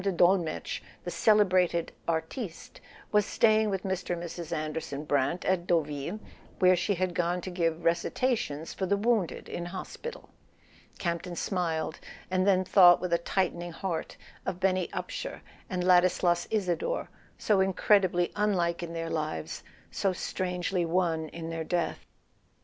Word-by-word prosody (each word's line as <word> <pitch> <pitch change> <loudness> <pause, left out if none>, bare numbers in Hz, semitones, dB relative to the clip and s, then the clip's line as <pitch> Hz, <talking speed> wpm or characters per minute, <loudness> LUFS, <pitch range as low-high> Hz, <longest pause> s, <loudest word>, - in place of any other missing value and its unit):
de 195 - +1
Dolmetsch, 175 -2 +1 0.2
"the 175 - -4
celebrated 185 -3 +3 0.2
artiste 165 +4 -4 0.2
," - - -23
was 210 0 +4
staying 220 0 +3
with 195 -2 -2
Mr. 190 -2 -2
and 170 - -6
Mrs. 170 -1 -6
Anderson 155 -2 -3
Brant 145 +4 0
at 185 -2 +1
Deauville, 155 +3 0 0.4
where 185 -1 +5
she 180 +3 0
had 185 0 -1
gone 175 +1 0
to 185 - -6
give 165 -2 -1
recitations 170 - 0
for 190 - -2
the 200 - +2
wounded 215 -5 0
in 175 - -4
hospital. 190 - -7 0.7
Campton 175 0 -3
smiled, 165 -4 -2 0.3
and 185 +1 +2
then 185 -1 +4
thought 175 -2 +7
with 180 -1 -2
a 170 - +3
tightening 175 -1 -1
heart 175 -2 -4 0.3
of 180 - -3
Benny 185 -1 +1
Upsher - - -5 0.3
and 180 -2 -1
Ladislas 180 -1 +4
Isador, 215 - -1 0.3
so 210 -3 +2
incredibly 190 -2 +3
unlike 180 -5 +1
in 170 -1 -5
their 165 0 -3
lives, 150 - -3 0.3
so 195 -2 0
strangely 180 0 -2
one 165 -2 0
in 165 0 -6
their 165 -1 -3
death. 170 0 -2
175 Hz, 145 wpm, -29 LUFS, 170-190 Hz, 0.7 s, thought